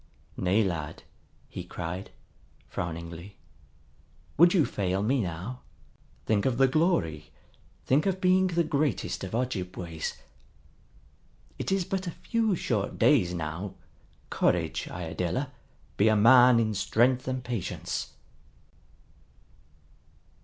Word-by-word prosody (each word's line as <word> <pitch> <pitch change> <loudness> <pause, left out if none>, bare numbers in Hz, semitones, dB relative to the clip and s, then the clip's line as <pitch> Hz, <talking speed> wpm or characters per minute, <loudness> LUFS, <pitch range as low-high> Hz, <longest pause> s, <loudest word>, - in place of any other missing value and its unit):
"Nay, 95 +5 +2
lad," 80 -5 -4 0.4
he - - -7
cried, 90 +4 -6 0.6
frowningly. 85 +3 -6 1.0
"Would 170 +3 +6
you 175 -7 +4
fail 95 0 -1
me 130 +4 +2
now? 95 +7 -5 0.7
Think 105 0 +2
of 125 -3 0
the 135 0 +5
glory, 130 - 0 0.6
think 145 +7 +2
of 190 -1 0
being 185 0 +4
the 170 -1 +1
greatest 150 -3 -1
of 95 +3 -4
Ojibways. 90 -9 -3 1.4
It - - -2
is 195 -2 +1
but 190 -1 -3
a 170 - -6
few 225 -4 0
short 105 - -2
days 110 -13 +4
now. 85 +4 -4 0.6
Courage, - - 0
Iadilla, 90 - -3 0.5
be 100 - +4
a 110 - +5
man 120 +2 +7
in 110 -1 +1
strength 120 +6 +2
and 130 -1 -2
patience." 120 -6 -4
115 Hz, 110 wpm, -28 LUFS, 90-145 Hz, 1.4 s, man